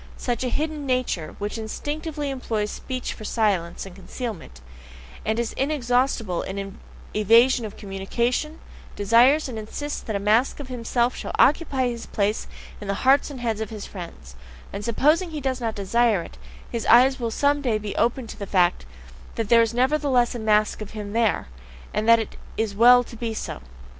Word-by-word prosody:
Such 245 Hz, 0 st, -2 dB
a 250 Hz, -, 0 dB
hidden 300 Hz, +1 st, -2 dB
nature, 250 Hz, -11 st, -1 dB
which 210 Hz, +2 st, -4 dB
instinctively 295 Hz, +6 st, -4 dB
employs 220 Hz, -5 st, -2 dB
speech 255 Hz, -1 st, -4 dB
for 215 Hz, -, -11 dB
silence 200 Hz, -7 st, 0 dB
and 190 Hz, -2 st, -11 dB
concealment, 195 Hz, -, -7 dB, 0.6 s
and 220 Hz, +1 st, 0 dB
is 235 Hz, -1 st, -1 dB
inexhaustible 250 Hz, -, 0 dB
in 195 Hz, 0 st, -6 dB, 0.3 s
evasion 230 Hz, +4 st, +4 dB
of 210 Hz, -, -8 dB
communication, 235 Hz, +10 st, -2 dB, 0.4 s
DESIRES 240 Hz, +9 st, +4 dB
and 235 Hz, -4 st, -5 dB
insists 290 Hz, +7 st, -5 dB
that 220 Hz, -, -4 dB
a -, -, 0 dB
mask 220 Hz, +8 st, +2 dB
of 275 Hz, -3 st, -7 dB
himself 245 Hz, 0 st, 0 dB
shall -, -, -6 dB
occupy 280 Hz, -3 st, +3 dB
his 235 Hz, -1 st, -5 dB
place 210 Hz, +1 st, -1 dB, 0.3 s
in 205 Hz, -, -7 dB
the 200 Hz, +5 st, -3 dB
hearts 275 Hz, +3 st, +5 dB
and 265 Hz, -4 st, -8 dB
heads 225 Hz, -3 st, -1 dB
of 220 Hz, -, -3 dB
his 215 Hz, -2 st, -7 dB
friends; 170 Hz, -, -10 dB, 0.4 s
and 200 Hz, +1 st, -5 dB
supposing 300 Hz, -, +2 dB
he 310 Hz, -2 st, -5 dB
does 260 Hz, -2 st, -2 dB
not 225 Hz, -2 st, -2 dB
desire 210 Hz, -1 st, +2 dB
it, -, -, -13 dB, 0.3 s
his 235 Hz, -2 st, -3 dB
eyes 260 Hz, +3 st, +6 dB
will 235 Hz, -2 st, -1 dB
some 285 Hz, +5 st, +1 dB
day 240 Hz, -6 st, +1 dB
be 210 Hz, -1 st, -5 dB
opened 235 Hz, 0 st, 0 dB
to -, -, -9 dB
the 200 Hz, -, -5 dB
fact 175 Hz, -, +2 dB, 0.5 s
that 225 Hz, -3 st, -2 dB
there 235 Hz, -1 st, +7 dB
is 225 Hz, -1 st, +1 dB
nevertheless 260 Hz, 0 st, +2 dB
a 240 Hz, -, -5 dB
mask 215 Hz, -1 st, +2 dB
of 215 Hz, +1 st, -8 dB
him 205 Hz, -1 st, -5 dB
there 225 Hz, -, +1 dB, 0.5 s
and 215 Hz, +2 st, 0 dB
that 230 Hz, -, +8 dB
it 225 Hz, -, -5 dB, 0.2 s
is 220 Hz, -2 st, -1 dB
well 245 Hz, +4 st, +7 dB
to 235 Hz, -, -12 dB
be 230 Hz, -1 st, -4 dB
so. 65 Hz, -, -5 dB
230 Hz, 185 wpm, -24 LUFS, 210-260 Hz, 0.6 s, that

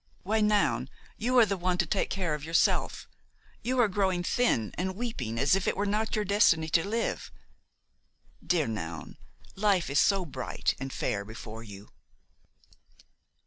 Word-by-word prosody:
Why, 220 Hz, +3 st, +1 dB
Noun, 200 Hz, -, +2 dB, 0.3 s
you 250 Hz, +3 st, 0 dB
are 235 Hz, -, +8 dB
the 200 Hz, -1 st, -2 dB
one 180 Hz, 0 st, 0 dB
to 175 Hz, -, +2 dB
take 195 Hz, +5 st, 0 dB
care 180 Hz, -5 st, -1 dB
of 150 Hz, -1 st, -4 dB
yourself; 165 Hz, +2 st, +1 dB, 0.5 s
you 255 Hz, +1 st, -1 dB
are 240 Hz, -, +5 dB
growing 190 Hz, -3 st, 0 dB
thin 170 Hz, -, +1 dB
and 185 Hz, +1 st, -2 dB
weeping 185 Hz, -, -4 dB
as 140 Hz, +8 st, +4 dB
if 195 Hz, -, -1 dB
it -, -, 0 dB
were 205 Hz, -, 0 dB
not 215 Hz, +2 st, 0 dB
your 210 Hz, -1 st, 0 dB
destiny 185 Hz, -6 st, +3 dB
to 165 Hz, +1 st, +3 dB
live; 225 Hz, +3 st, -2 dB, 1.1 s
dear 170 Hz, -4 st, +1 dB
Noun, 85 Hz, -9 st, -6 dB, 0.4 s
live 195 Hz, -6 st, +1 dB
is 140 Hz, -, +3 dB
so 195 Hz, -2 st, +3 dB
bright 135 Hz, -5 st, -2 dB
and 135 Hz, 0 st, -5 dB
fair 100 Hz, -5 st, -2 dB
before 110 Hz, +1 st, -9 dB
you!" 100 Hz, -2 st, -11 dB
180 Hz, 160 wpm, -29 LUFS, 135-210 Hz, 1.1 s, are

